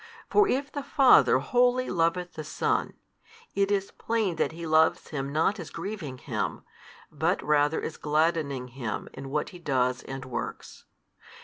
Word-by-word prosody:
For 420 0 +5
if 275 -1 -1
the 285 - -4
Father 275 -2 +5
wholly 250 +1 +2
loveth 175 +1 0
the 155 - -6
Son, 150 - -1 0.6
it 200 0 +1
is 200 -1 0
plain 220 -7 -1
that - - +1
He 165 +1 -7
loves 160 0 +3
Him 140 -2 -3
not 165 +7 +1
as 165 -3 -7
grieving 165 -7 -6
Him, - - -3 0.5
but - - 0
rather 150 +1 +2
as 160 - -5
gladdening 150 -4 0
Him 120 -4 -5
in 135 0 -8
what 150 +2 -1
He 180 - -12
does 130 -5 0
and 135 -1 -7
works. 130 - -6
160 Hz, 155 wpm, -27 LUFS, 140-200 Hz, 0.6 s, For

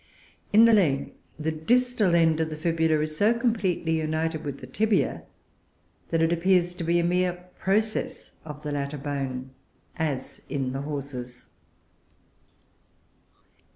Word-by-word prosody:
In 220 +2 +7
the 230 - +6
leg, 150 -10 +2 0.2
the 155 +1 -1
distal 215 +3 +2
end 160 -1 +4
of 160 -1 0
the 155 - -5
fibula 160 -1 +1
is 155 0 -3
so 210 +8 +3
completely 200 -9 0
united 155 0 -1
with 140 -2 -4
the - - -9
tibia 210 - 0 0.8
that 165 -1 +2
it 165 +1 +3
appears 175 0 +2
to 175 - -6
be 170 +1 +2
a 170 - +2
mere 180 +1 +2 0.3
process 215 +3 -1
of 150 -1 -9
the 150 - -3
latter 140 0 -3
bone, 135 -2 -4 0.5
as 150 -5 -3
in 135 -3 -2
the 135 - -3
Horses. 135 -4 -6
160 Hz, 140 wpm, -26 LUFS, 145-180 Hz, 0.8 s, In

